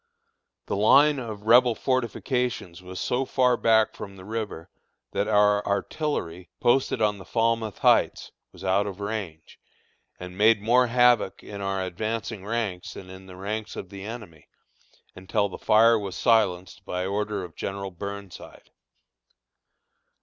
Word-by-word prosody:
The - - -2
line 140 +8 +5
of 110 -4 -7
Rebel 120 +1 +5
fortifications 125 - -2
was 90 0 -8
so 125 +2 0
far 125 -1 +2
back 110 -2 +3
from 100 -1 -8
the 95 -1 -12
river, 105 -6 -5 0.4
that 100 - -1
our 105 -1 +3
artillery, 100 - -3
posted 120 -2 +2
on 105 -1 +1
the - - -9
Falmouth 115 0 0
Heights, - - +2 0.2
was - - -14
out 95 +2 +1
of 100 -1 -7
range, 100 -7 -6 0.6
and 90 0 -8
made 110 +2 +4
more 125 +4 +3
havoc 120 -4 +3
in 100 -1 -8
our 95 -1 -2
advancing 110 +3 -4
ranks 105 -4 -3
than 95 -1 -10
in 95 0 -12
the 90 - -11
ranks 105 +3 -4
of 95 - -7
the 100 -1 -9
enemy, 100 -9 -9 0.7
until 100 +3 -1
the - - -9
fire 115 +1 +5
was 100 -3 -6
silenced 100 -5 +1
by 90 0 -3
order 105 0 -2
of 85 -3 -10
General 100 0 -5
Burnside. 100 0 -9
105 Hz, 145 wpm, -25 LUFS, 95-115 Hz, 0.7 s, line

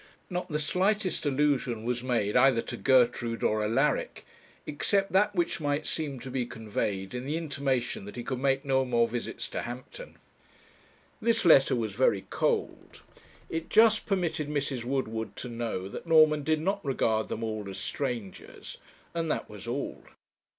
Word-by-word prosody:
Not 180 0 -3
the 150 - -1
slightest 185 +3 0
allusion 135 -5 +1
was 120 0 -1
made 115 -5 0
either 125 -2 +5
to - - -5
Gertrude 120 -3 +2
or 110 0 +2
Alaric, 110 +2 0 0.4
except 195 +6 0
that 205 +2 +3
which 170 -2 0
might 145 +1 -1
seem 145 -5 -3
to 130 - -7
be 130 -1 0
conveyed 105 -4 -3
in 125 0 -4
the 155 +3 -1
intimation 140 -9 -2
that 105 - -9
he 120 - -5
could 130 0 -3
make 135 +1 +1
no 135 -1 +2
more 120 -2 +2
visits 120 0 -4
to - - -3
Hampton. 125 - -8 1.0
This 230 -2 +2
letter 135 -6 +6
was 110 -4 -2
very 100 -4 +2
cold. - - -2 0.4
It 165 0 -4
just 220 0 +5
permitted 170 -6 -1
Mrs. 140 -4 -2
Woodward 115 -4 -2
to 125 - -6
know 115 -5 -3
that 170 - -8
Norman 155 -2 +6
did 155 +1 0
not 195 +4 -1
regard 115 -6 0
them 115 - -4
all 110 -2 -3
as 95 - -6
strangers; 120 -9 -5 0.3
and 165 -1 -2
that - - -2
was - - -10
all. - - -4
135 Hz, 165 wpm, -29 LUFS, 115-155 Hz, 1.0 s, letter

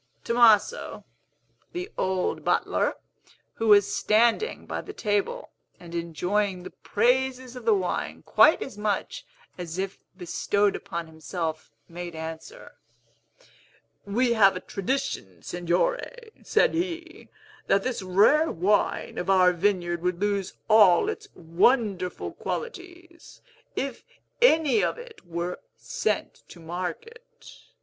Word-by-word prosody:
Tomaso, 235 - +3 0.7
the 365 +4 -5
old 185 -1 -1
butler, - - +1 0.6
who 225 - -3
was 205 -2 +5
standing 235 - +2
by - - -4
the 410 - -9
table, 215 - -2 0.3
and 170 -1 -12
enjoying 180 +3 -1
the - - -9
praises 255 +2 0
of 250 -2 -9
the 225 - +5
wine 185 -2 -3
quite - - +5
as 215 -6 -10
much 210 -2 -2 0.3
as 170 -1 -6
if 195 0 -4 0.2
bestowed 200 +3 0
upon 170 0 -5
himself, 160 0 -5 0.2
made 175 0 -7
answer, 160 - -9 1.2
"We 235 +4 +1
have 200 -4 +5
a - - -3
tradition, 185 - -4
Signore," 445 - -2
said - - +2
he, 335 -1 -4 0.4
"that 195 - +3
this 255 -4 -2
rare 205 - +4
wine 190 +5 0
of 180 - -4
our 185 -2 +5
vineyard 175 -2 0
would 180 0 -1
lose 200 -2 -1
all 215 - +6
its 440 -1 -6
wonderful 185 +2 +1
qualities, 350 -6 -7 0.4
if 270 -3 -4 0.4
any 325 - +4
of - - -1
it 480 -2 -12
were 170 +1 -4 0.2
sent - - -3
to 175 - -13
market. 180 - -6
205 Hz, 120 wpm, -26 LUFS, 180-275 Hz, 1.2 s, all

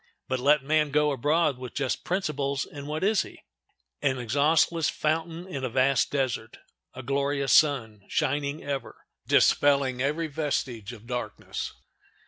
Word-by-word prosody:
But 130 0 -1
let 145 +2 +4
man 150 +1 +2
go 150 +1 +2
abroad 145 +1 +1
with 125 -1 -8
just 135 -3 -1
principles, 145 -7 -1
and 145 -1 -9
what 155 +3 -3
is 210 0 +3
he? - - -10 0.6
An 130 -2 +1
exhaustless 150 +6 +2
fountain 165 +2 -2
in 160 -8 -6
a 130 - -1
vast 130 -1 +2
desert! 130 -5 -2 0.4
A 130 - -7
glorious 140 +1 0
sun, 115 -9 +3
shining 145 0 -1
ever, 140 -1 -5 0.2
dispelling 140 -3 +3
every 150 +5 0
vestige 135 -8 -3
of 115 -2 -12
darkness. 125 0 -4
140 Hz, 140 wpm, -27 LUFS, 130-150 Hz, 0.6 s, let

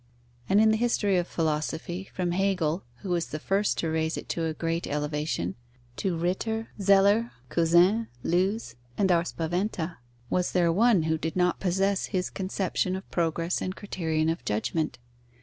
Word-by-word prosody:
And 195 - +5
in 220 0 +6
the 220 - +2
history 220 -4 +2
of 175 -1 0
philosophy, 160 +3 -2
from 180 -2 -1
Hegel, 185 -3 +1 0.2
who 195 - -5
was 170 -2 0
the 155 - -4
first 195 +6 0
to 165 - -1
raise 160 0 0
it - - -7
to 165 - -1
a 160 - -1
great 165 +1 -2
elevation, 150 - -2 0.4
to 185 -4 -1
Ritter, 220 +6 -1
Zeller, 200 +4 +4 0.2
Cousin, 175 +7 +4 0.2
Lewes, 185 - 0 0.2
and 195 -2 +3
our 170 -1 +4
Spaventa, 175 0 -2 0.3
was 180 +7 0
there 175 -2 +3
one 215 -2 +4
who 160 0 0
did 160 0 -3
not 180 -1 +2
possess 195 +1 +1
his 185 -1 -2
conception 185 -1 -1
of 190 - -8
progress 165 +1 0
and 185 +1 -3
criterion 160 -6 -1
of 165 +1 -2
judgment? 130 +9 -1
175 Hz, 165 wpm, -27 LUFS, 160-195 Hz, 0.4 s, in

